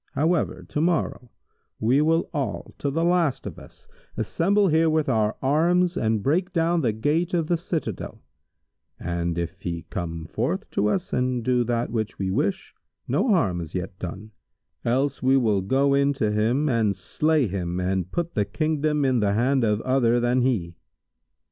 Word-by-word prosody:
However, 160 +3 0
to 150 - -1
morrow, 160 -7 0 0.5
we 125 +6 +3
will 165 +2 +2
all, 145 -4 -3
to 140 - -1
the 165 +4 -1
last 170 -5 +1
of - - -7
us, 460 - -17 0.3
assemble 200 +4 +2
here 160 0 +3
with 155 -1 +1
our 110 -4 +1
arms 170 +6 +2
and 110 -2 0
break 175 +7 +1
down 170 -1 +1
the 120 -6 +1
gate 155 - 0
of 165 -2 +1
the 175 - 0
citadel[FN#153]; 165 - -4 0.8
and 85 0 -2
if 85 +3 -4
he 85 -2 -4
come 85 -3 -4
forth - - -2
to 105 - +1
us 180 - -1
and 125 -1 0
do 125 -1 +2
that 120 0 -1
which 110 -2 -3
we 95 -1 -2
wish, 190 - -1 0.3
no - - +1
harm 100 - +2
is 80 +1 -8
yet 90 0 -5
done[FN#154]; 95 +5 -7 0.5
else 135 +4 0
we 130 +1 +4
will 110 -6 +2
go 135 +8 +2
in 140 +1 +3
to 110 -6 0
him 115 +8 +1
and 115 -6 +1
slay 155 +1 +1
him 90 -2 -3
and 90 0 -1
put 170 0 -2
the 105 - +1
Kingdom 150 +5 0
in 130 -2 +2
the 100 -2 +1
hand 130 +4 +2
of 105 -1 +1
other 125 -2 +2
than 120 +1 +2
he." 105 -10 0
130 Hz, 175 wpm, -24 LUFS, 105-155 Hz, 0.8 s, we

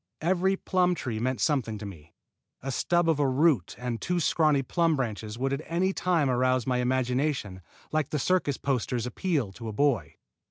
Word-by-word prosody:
Every 185 +3 +2
plum 180 -1 +1
tree 120 -8 -4
meant 125 0 -1
something 120 -4 0
to 105 - -7
me. 85 -5 -11 0.5
A 135 - -3
stub 175 +6 +1
of 160 -3 +2
a 145 - +3
root 130 - +2
and 125 -2 -4
two 180 0 0
scrawny 155 -4 +2
plum 165 +4 +1
branches 110 -4 -3
would 135 +2 -1
at 140 - -2
any 185 +3 +1
time 175 -7 +1
arouse 130 -1 +2
my 125 -1 0
imagination 125 -5 -1 0.3
like 155 -3 0
the 150 - -1
circus 145 -2 +1
posters' 125 -3 -1
appeal 135 - -1
to 115 +4 -9
a - - -3
boy. 140 -2 +1
135 Hz, 185 wpm, -27 LUFS, 120-165 Hz, 0.5 s, a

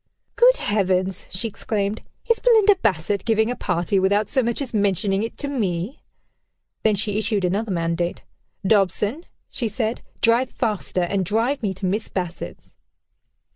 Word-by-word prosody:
"Good - - +6
heavens!" 190 - 0
she 185 +5 0
exclaimed: 205 -1 -2 0.3
"is 465 -1 +3
Belinda 435 -4 +5
Bassett 200 -1 0
giving 220 0 +2
a - - -2
party, 180 0 0
without 200 +3 +2
so 260 - +2
much 235 -1 -1
as 270 -4 -3
mentioning 200 -1 +1
it 225 - -4
to 285 - -2
me?" 205 - -2 0.8
Then 215 -1 +3
she 210 +1 0
issued 205 -3 0
another 205 +5 -1
mandate. 170 -1 -1 0.4
"Dobson," 205 - +1 0.2
she 235 - -2
said, 225 0 -2 0.2
"drive 240 +2 +3
faster, 210 -5 -1
and 190 +2 0
drive 230 - 0
me 205 -4 0
to 190 - -5
Miss 205 +4 -1
Bassett's." 180 -2 -6
210 Hz, 150 wpm, -22 LUFS, 190-230 Hz, 0.8 s, Good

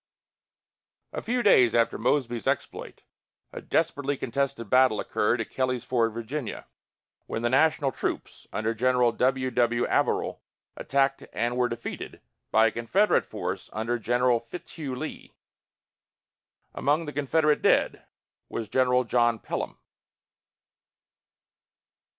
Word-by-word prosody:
A - - -3
few 245 +1 -1
days 125 - +5
after 115 -1 +2
Mosby's 120 -2 0
exploit, - - -3 0.5
a - - -6
desperately 145 -4 0
contested 135 -2 -2
battle 130 -1 +4
occurred 110 +3 0
at 115 - -4
Kelly's 130 -2 -1
Ford, 115 -3 +1
Va., 115 +2 -5 0.6
when 115 - -4
the 120 - +1
National 140 0 +3
troops - - -5
under 110 +1 -1
General 125 +1 +2
W. 130 +2 0
W. 120 -1 +2
Averill - - 0 0.3
attacked 135 0 0
and 120 +1 -1
were 125 0 +1
defeated 115 0 -6 0.3
by 110 +1 +4
a 115 - +3
Confederate 175 - +2
force - - -5
under 115 +2 -2
General 120 +1 +2
Fitzhugh 140 +2 -7
Lee. 155 +5 -7 1.4
Among 150 +4 +1
the 150 - -6
Confederate 150 +1 +2
dead - - +2 0.5
was 115 - -4
General 125 +1 +3
John 120 -1 +2
Pelham. - - -5
125 Hz, 120 wpm, -27 LUFS, 115-140 Hz, 1.4 s, days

